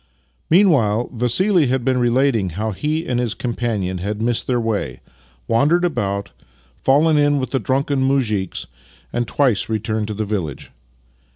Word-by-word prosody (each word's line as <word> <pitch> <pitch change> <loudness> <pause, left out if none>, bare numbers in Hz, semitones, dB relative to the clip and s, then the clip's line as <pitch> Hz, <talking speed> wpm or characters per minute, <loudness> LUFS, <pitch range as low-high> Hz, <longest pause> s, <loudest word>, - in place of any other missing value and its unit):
Meanwhile, 135 - +3
Vassili 150 - +2
had 125 -1 -1
been 130 -1 +2
relating 120 -4 +2
how 105 +6 -3
he 155 - -2
and 125 -5 -1
his 120 -3 -1
companion 110 -7 -2
had 105 +3 -3
missed 115 +1 -1
their 125 -2 +1
way, 115 -3 -2 0.5
wandered 150 +10 +3
about, 100 - -2 0.5
fallen 150 +3 +3
in 145 0 +3
with 130 -2 -3
the 135 - +1
drunken 135 +2 0
muzhiks, 120 -9 0 0.5
and 120 0 -1
twice 125 -9 +1
returned 110 -1 -2
to 105 - -4
the 110 +1 -2
village. 95 -9 -4
120 Hz, 150 wpm, -20 LUFS, 105-140 Hz, 0.5 s, Meanwhile